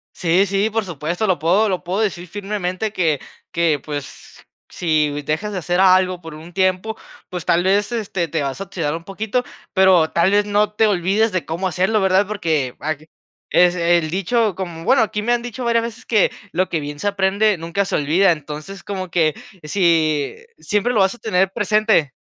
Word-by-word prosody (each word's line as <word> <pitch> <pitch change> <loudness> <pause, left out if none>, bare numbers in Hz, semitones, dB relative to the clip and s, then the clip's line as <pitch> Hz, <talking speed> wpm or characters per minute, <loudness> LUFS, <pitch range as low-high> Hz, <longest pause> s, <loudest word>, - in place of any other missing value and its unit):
Sí, 180 +2 +2
sí, 200 +3 +1
por 225 0 0
supuesto, 175 +3 -3
lo 185 -4 +2
puedo 185 +8 +2
lo 180 -2 -2
puedo 185 +4 -2
decir 185 -4 -2
firmemente, 200 +1 -3
que 165 -8 +1 0.3
que, 170 -4 +1
pues, 145 -3 -8 0.2
si 150 -3 0
dejas 160 +9 -2
de 190 - -2
hacer 175 +1 -1
algo 185 -1 +4
por 165 -2 -9
un 160 +3 -11
tiempo, 190 +4 0 0.3
pues 180 -2 -6
tal 170 +1 +2
vez, 200 +4 +2
este, 200 -7 -2
te 160 0 -2
vas 140 +1 -3
a 195 - -4
oxidar 165 -6 -3
un 165 - -7
poquito, 220 +6 -2 0.3
pero 185 -4 +4
tal 170 +2 +3
vez 205 0 +3
no 210 0 +1
te 220 +1 +3
olvides 200 +3 +1
de 185 -2 -2
cómo 170 +4 -2
hacerlo, 190 +5 +1
¿verdad? 190 +1 +3
Porque 160 -11 -1
ag 155 +1 -4 0.4
es 180 0 +4
el 170 -2 +2
dicho, 200 +4 0
como, 170 -3 -6
bueno, 250 +4 +4
aquí 210 -1 -2
me 240 +3 0
han 240 - 0
dicho 245 +1 -6
varias 235 -1 +2
veces 235 +2 -7
que 215 -4 +3 0.2
lo 185 +2 0
que 160 -3 -2
bien 145 0 -6
se - - -2
aprende 200 +1 +2
nunca 170 +5 -2
se - - -2
olvida. 170 +6 +3
Entonces, 155 +5 -8
como 190 -2 -5
que 160 -3 +2 0.3
si, 155 -3 +1 0.2
siempre 210 +4 0
lo 215 - +2
vas 190 +3 +3
a - - -16
tener 190 -3 +1
presente. 210 -8 +2
185 Hz, 195 wpm, -20 LUFS, 165-205 Hz, 0.4 s, algo